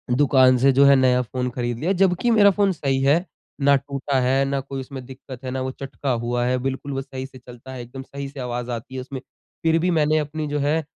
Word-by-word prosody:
दुकान 130 Hz, -2 st, +5 dB
से 135 Hz, +2 st, +4 dB
जो 140 Hz, +2 st, +5 dB
है 140 Hz, 0 st, +7 dB
नया 125 Hz, -1 st, +3 dB
फ़ोन 125 Hz, +1 st, -3 dB
ख़रीद 120 Hz, -1 st, -3 dB
लिया। 175 Hz, +5 st, 0 dB
जब 185 Hz, -1 st, +3 dB
कि 240 Hz, -, +2 dB
मेरा 205 Hz, -3 st, +6 dB
फ़ोन 200 Hz, 0 st, +2 dB
सही 135 Hz, -4 st, -1 dB
है 155 Hz, +6 st, +3 dB, 0.4 s
ना 140 Hz, 0 st, +5 dB
टूटा 140 Hz, 0 st, -2 dB
है 135 Hz, +2 st, +2 dB
ना 135 Hz, 0 st, -1 dB
कोई 135 Hz, 0 st, -6 dB
उसमें 130 Hz, -1 st, -8 dB
दिक़्क़त 130 Hz, 0 st, -11 dB
है 130 Hz, -, -3 dB
ना 130 Hz, -, -3 dB
वो 130 Hz, 0 st, -2 dB
चटका 135 Hz, 0 st, -5 dB
हुआ 120 Hz, 0 st, 0 dB
है 125 Hz, +1 st, +1 dB
बिल्कुल 135 Hz, +2 st, -4 dB
वो 135 Hz, -, -2 dB
सही 130 Hz, -1 st, -7 dB
से 130 Hz, -1 st, -13 dB
चलता 125 Hz, +1 st, -12 dB
है। 125 Hz, -, -6 dB
एकदम 125 Hz, +3 st, -9 dB
सही 140 Hz, +1 st, -7 dB
से 140 Hz, -, -11 dB
आवाज़ 125 Hz, -1 st, -4 dB
आती 120 Hz, +3 st, -6 dB
है 130 Hz, -, -3 dB
उसमें। 130 Hz, +1 st, -7 dB, 0.4 s
फ़िर 165 Hz, 0 st, +3 dB
भी 180 Hz, +2 st, +1 dB
मैंने 155 Hz, -1 st, +2 dB
अपनी 150 Hz, +1 st, -4 dB
जो 145 Hz, 0 st, -2 dB
है 150 Hz, +3 st, +1 dB
135 Hz, 250 wpm, -22 LUFS, 130-145 Hz, 0.4 s, है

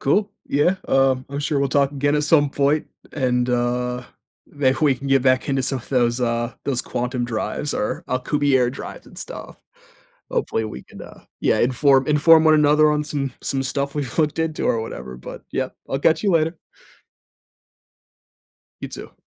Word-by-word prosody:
Cool. 200 Hz, +9 st, +1 dB, 0.2 s
Yeah. 150 Hz, +7 st, +2 dB
Um, 135 Hz, -1 st, +2 dB
I'm 140 Hz, +1 st, -5 dB
sure 145 Hz, 0 st, -1 dB
we'll 140 Hz, 0 st, +1 dB
talk 140 Hz, 0 st, +2 dB
again 145 Hz, +1 st, 0 dB
at 150 Hz, 0 st, +1 dB
some 145 Hz, -2 st, +3 dB
point, 145 Hz, +2 st, +1 dB, 0.3 s
and, 125 Hz, -3 st, 0 dB
uh, 125 Hz, 0 st, -1 dB, 0.4 s
maybe 135 Hz, -3 st, 0 dB
we 145 Hz, -3 st, +4 dB
can 135 Hz, +2 st, -8 dB
get 135 Hz, -1 st, +3 dB
back 130 Hz, +1 st, +2 dB
into 135 Hz, -1 st, +1 dB
some 135 Hz, 0 st, -1 dB
of 120 Hz, -, -14 dB
those, 120 Hz, -2 st, +1 dB
uh, 120 Hz, 0 st, -1 dB
those 130 Hz, -4 st, 0 dB
quantum 125 Hz, 0 st, -2 dB
drives, 120 Hz, +5 st, -3 dB
or 105 Hz, -, -2 dB
Alcubierre 130 Hz, -1 st, +1 dB
drives 135 Hz, -, -9 dB
and -, -, -16 dB
stuff. -, -, -9 dB, 0.7 s
Hopefully, 110 Hz, -, -1 dB
we 110 Hz, -, -7 dB
can, -, -, -12 dB
uh, -, -, -13 dB, 0.2 s
yeah, -, -, +2 dB
inform 135 Hz, +2 st, +3 dB
inform 155 Hz, +2 st, +5 dB
one 155 Hz, 0 st, +6 dB
another 150 Hz, 0 st, +5 dB
on 150 Hz, 0 st, 0 dB
some 140 Hz, -3 st, -3 dB
some 135 Hz, -1 st, -1 dB
stuff 140 Hz, +1 st, -2 dB
we've 135 Hz, -6 st, -4 dB
looked 150 Hz, -1 st, +1 dB
into 160 Hz, -1 st, -1 dB
or 115 Hz, -, +1 dB
whatever. 65 Hz, -, -7 dB
But, 60 Hz, -, -10 dB
yep, -, -, -3 dB
I'll 135 Hz, -, -1 dB
catch 160 Hz, +5 st, +2 dB
you 205 Hz, -, +2 dB
later. 165 Hz, -1 st, +1 dB, 2.3 s
You, -, -, -4 dB
too. -, -, -10 dB
135 Hz, 175 wpm, -22 LUFS, 125-150 Hz, 2.3 s, one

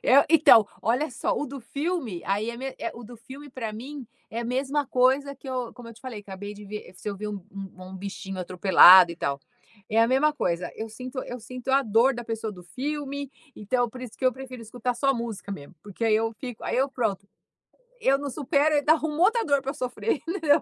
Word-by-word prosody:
Eh, 275 Hz, +2 st, +6 dB
então, 300 Hz, -9 st, +7 dB, 0.2 s
olha 255 Hz, +7 st, +1 dB
só, 240 Hz, -, -1 dB
o 295 Hz, -, -2 dB
do 275 Hz, 0 st, -7 dB
filme, 280 Hz, -, -3 dB
aí 205 Hz, +4 st, 0 dB
é 235 Hz, -, -8 dB
me 265 Hz, +2 st, -5 dB
eh, -, -, -3 dB
o 240 Hz, -, -9 dB
do 240 Hz, +2 st, -11 dB
filme, 275 Hz, +5 st, -11 dB
para 230 Hz, -4 st, -5 dB
mim, 260 Hz, +3 st, -8 dB, 0.2 s
é 230 Hz, +2 st, -3 dB
a -, -, -4 dB
mesma 270 Hz, +3 st, -1 dB
coisa 265 Hz, +2 st, +2 dB
que 270 Hz, 0 st, -12 dB
eu, 250 Hz, -2 st, -3 dB
como 240 Hz, -2 st, -11 dB
eu 230 Hz, -, -11 dB
te -, -, -18 dB
falei, 245 Hz, -5 st, -7 dB
acabei 205 Hz, +1 st, -8 dB
de 205 Hz, 0 st, -11 dB
ver 210 Hz, -2 st, -8 dB
se 210 Hz, -, -7 dB
eu 200 Hz, -, -4 dB
ver 210 Hz, +1 st, -5 dB
um 200 Hz, -3 st, -6 dB
um 195 Hz, -2 st, -9 dB
um 190 Hz, -, -8 dB
bichinho 195 Hz, 0 st, -6 dB
atropelado, 185 Hz, 0 st, +8 dB
e -, -, -11 dB
tal, 140 Hz, -4 st, -2 dB, 0.5 s
é 220 Hz, +1 st, +3 dB
a 230 Hz, -, +6 dB
mesma 290 Hz, +4 st, +3 dB
coisa. 175 Hz, -10 st, -1 dB
Eu 220 Hz, 0 st, -5 dB
sinto 255 Hz, +4 st, -8 dB
eu 245 Hz, -1 st, -7 dB
sinto 255 Hz, +3 st, -9 dB
a 275 Hz, +1 st, +4 dB
dor 230 Hz, +4 st, +3 dB
da 240 Hz, 0 st, -6 dB
pessoa 225 Hz, -1 st, -4 dB
do 180 Hz, -2 st, -12 dB
filme, 280 Hz, -, -4 dB, 0.3 s
então 245 Hz, +3 st, 0 dB
por 250 Hz, -, -10 dB
isso 240 Hz, -, -7 dB
que 260 Hz, -, -6 dB
eu 255 Hz, -, +4 dB
prefiro 255 Hz, -2 st, -9 dB
escutar 245 Hz, +2 st, -3 dB
só 275 Hz, +3 st, +2 dB
música 230 Hz, -4 st, -5 dB
mesmo, 145 Hz, 0 st, -9 dB
porque 205 Hz, +3 st, -5 dB
aí 220 Hz, -1 st, +4 dB
eu 225 Hz, +1 st, 0 dB
fico 245 Hz, -2 st, -8 dB
aí -, -, -1 dB
eu 270 Hz, +2 st, +2 dB
pronto, 210 Hz, -7 st, -2 dB, 0.7 s
eu 275 Hz, -9 st, +3 dB
não 285 Hz, 0 st, -4 dB
supero 300 Hz, +2 st, +2 dB
e 290 Hz, -, +5 dB
ainda 300 Hz, +2 st, +5 dB
arrumo 315 Hz, 0 st, -2 dB
outra 450 Hz, +4 st, +4 dB
dor 280 Hz, -2 st, +2 dB
para 270 Hz, +1 st, -3 dB
eu -, -, -9 dB
sofrer, 275 Hz, -, -2 dB
entendeu? 325 Hz, -4 st, +3 dB
245 Hz, 240 wpm, -26 LUFS, 210-275 Hz, 0.7 s, atropelado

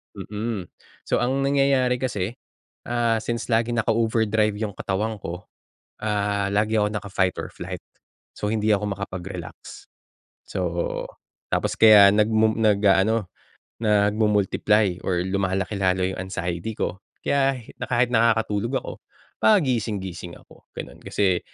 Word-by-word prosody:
Mm, 105 Hz, -3 st, -4 dB, 0.4 s
so -, -, +2 dB
ang 135 Hz, +2 st, 0 dB
nangyayari 135 Hz, -2 st, +2 dB
kasi, 120 Hz, -3 st, -3 dB, 0.5 s
ah, 120 Hz, -1 st, +1 dB
since 115 Hz, +1 st, -3 dB
lagi 115 Hz, +1 st, +1 dB
naka-overdrive 110 Hz, -2 st, +1 dB
yung 105 Hz, -3 st, -3 dB
katawan 105 Hz, +3 st, -2 dB
ko, 90 Hz, -3 st, -7 dB, 0.5 s
ah, 100 Hz, -1 st, 0 dB
lagi 105 Hz, +2 st, +1 dB
ako 105 Hz, 0 st, +2 dB
naka-fight 100 Hz, -3 st, -1 dB
or -, -, -3 dB
flight. -, -, -7 dB, 0.5 s
So 105 Hz, -, -3 dB
hindi 110 Hz, -1 st, 0 dB
ako 105 Hz, 0 st, -2 dB
makapag-relax, 90 Hz, -3 st, -7 dB, 0.6 s
so 85 Hz, -2 st, -3 dB, 0.4 s
tapos -, -, 0 dB
kaya 105 Hz, -3 st, +9 dB
nagmu 110 Hz, +1 st, +3 dB
nag-aano 105 Hz, 0 st, +3 dB, 0.6 s
nagmu-multiply 105 Hz, -2 st, +2 dB
or 90 Hz, -2 st, +1 dB
lumalaki 95 Hz, +1 st, -1 dB
lalo 95 Hz, -1 st, +2 dB
yung 95 Hz, -, -3 dB
anxiety 90 Hz, +2 st, -4 dB
ko 95 Hz, -, -2 dB, 0.3 s
kaya 135 Hz, -2 st, +1 dB, 0.2 s
na -, -, -3 dB
kahit 125 Hz, 0 st, +2 dB
nakakatulog 115 Hz, +1 st, +2 dB
ako -, -, -6 dB, 0.5 s
pagising-gising 105 Hz, -, +1 dB
ako, -, -, -19 dB
ganun. -, -, -8 dB
Kasi, 95 Hz, -3 st, +1 dB
105 Hz, 120 wpm, -24 LUFS, 95-115 Hz, 0.6 s, kaya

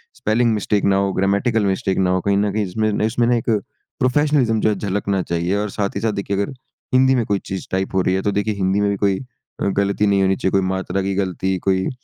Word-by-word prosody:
spelling 115 Hz, +1 st, +1 dB
mistake 105 Hz, -1 st, 0 dB
ना -, -, +3 dB
हो 100 Hz, 0 st, +1 dB
grammatical 100 Hz, +4 st, +1 dB
mistake 95 Hz, -1 st, 0 dB
ना 95 Hz, -1 st, +2 dB
हो 95 Hz, 0 st, +1 dB
कहीं 100 Hz, 0 st, +1 dB
न 105 Hz, 0 st, +1 dB
कहीं 105 Hz, 0 st, 0 dB
जिसमें 105 Hz, +3 st, 0 dB
इसमें 120 Hz, +2 st, +1 dB
ना 120 Hz, -, +3 dB
एक 115 Hz, 0 st, -2 dB, 0.5 s
प्रोफ़ेशनलिज़्म 130 Hz, -4 st, +2 dB
जो 110 Hz, -, +3 dB
है 105 Hz, -, +1 dB
झलकना 100 Hz, -1 st, -1 dB
चाहिए 85 Hz, +3 st, -1 dB
और 105 Hz, 0 st, -2 dB
साथ 100 Hz, 0 st, -2 dB
ही 100 Hz, -, -2 dB
साथ 110 Hz, -1 st, +1 dB
देखिए 100 Hz, 0 st, -2 dB
अगर 100 Hz, -, -1 dB, 0.4 s
हिंदी 130 Hz, +1 st, +5 dB
में 120 Hz, -3 st, +1 dB
कोई 100 Hz, -1 st, 0 dB
चीज़ 95 Hz, -1 st, -5 dB
टाइप 95 Hz, +1 st, -1 dB
हो 95 Hz, -, +3 dB
रही 90 Hz, +1 st, +1 dB
है 95 Hz, -, 0 dB
तो 100 Hz, -, 0 dB
देखिए 105 Hz, +2 st, 0 dB
हिंदी 95 Hz, 0 st, 0 dB
में 100 Hz, -, +2 dB
भी 100 Hz, -, 0 dB
कोई 100 Hz, -1 st, +1 dB, 0.4 s
अ, -, -, 0 dB
गलती 100 Hz, +1 st, +1 dB
नहीं 100 Hz, -1 st, +3 dB
होनी 95 Hz, 0 st, +2 dB
चाहिए 95 Hz, -, -1 dB
कोई 95 Hz, -, +3 dB
मात्रा 95 Hz, +1 st, -2 dB
की 95 Hz, +1 st, -1 dB
गलती 95 Hz, -1 st, -1 dB
कोई 95 Hz, -1 st, +2 dB
उ, -, -, -1 dB
100 Hz, 255 wpm, -20 LUFS, 95-110 Hz, 0.5 s, हिंदी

